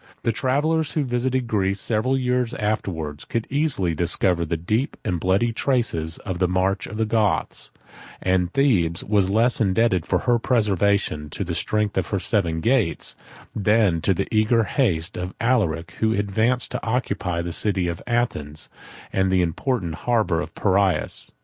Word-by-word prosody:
The 115 - +2
travellers, 145 +6 0
who 155 - +1
visited 130 0 -1
Greece 100 -3 0
several 120 +6 0
years 125 -2 0
afterwards, 85 -9 -3
could 115 -1 -3
easily 140 - +1
discover 85 +1 +2
the 85 +1 -2
deep 110 - -1
and 90 -2 -1
bloody 100 +7 +1
traces 110 - 0
of 90 -2 -5
the 90 - +3
march 95 +2 0
of 105 - -7
the 110 - +1
Goths; 110 -2 0 0.5
and 90 -1 +1
Thebes 95 - +1
was 100 -2 +2
less 115 +4 +3
indebted 95 -3 +2
for - - +2
her 120 -1 +3
preservation 100 - +1
to - - -4
the - - -4
strength 105 -2 0
of 85 - -3
her 100 - -1
seven 85 -4 0
gates, 115 -6 0 0.4
than 105 -5 +2
to 95 - +2
the 100 - -2
eager 110 +2 +3
haste 90 - 0
of 90 +1 -5
Alaric, 95 -9 0
who 110 0 +2
advanced 110 +5 0
to - - -4
occupy 100 -7 -1
the 85 0 -4
city 95 -3 0
of 85 0 -4
Athens, 75 -12 -2 0.4
and 95 0 +2
the 90 -1 +3
important 90 - -2
harbor 105 -6 0
of - - -6
the - - -13
Piraeus. 100 -1 +1
100 Hz, 165 wpm, -23 LUFS, 90-120 Hz, 0.5 s, the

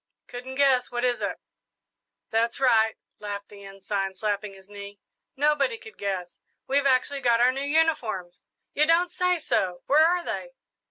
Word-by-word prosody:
"Couldn't 250 +2 -8
guess 265 -2 +3
what 240 0 -3
is 245 -1 +1
it?" - - -3 0.9
"That's 230 +2 0
right," 225 -4 +3 0.2
laughed 205 -1 -6
the 200 -1 -13
Ensign, 195 0 -4
slapping 205 0 -3
his 190 0 -17
knee; 200 0 -10 0.4
"nobody 300 - +2
could 445 -1 -13
guess. 185 -3 -4 0.3
We've 280 +1 +2
actually 275 +2 +1
got 235 -2 +3
our 245 +1 +5
new 270 +1 -4
uniforms!" 280 - 0 0.3
"You 300 +1 +3
don't 345 +2 +3
say 360 0 +1
so! 185 - -1
Where 300 +3 +5
are 355 +1 +1
they?" - - -5
245 Hz, 160 wpm, -26 LUFS, 200-285 Hz, 0.9 s, our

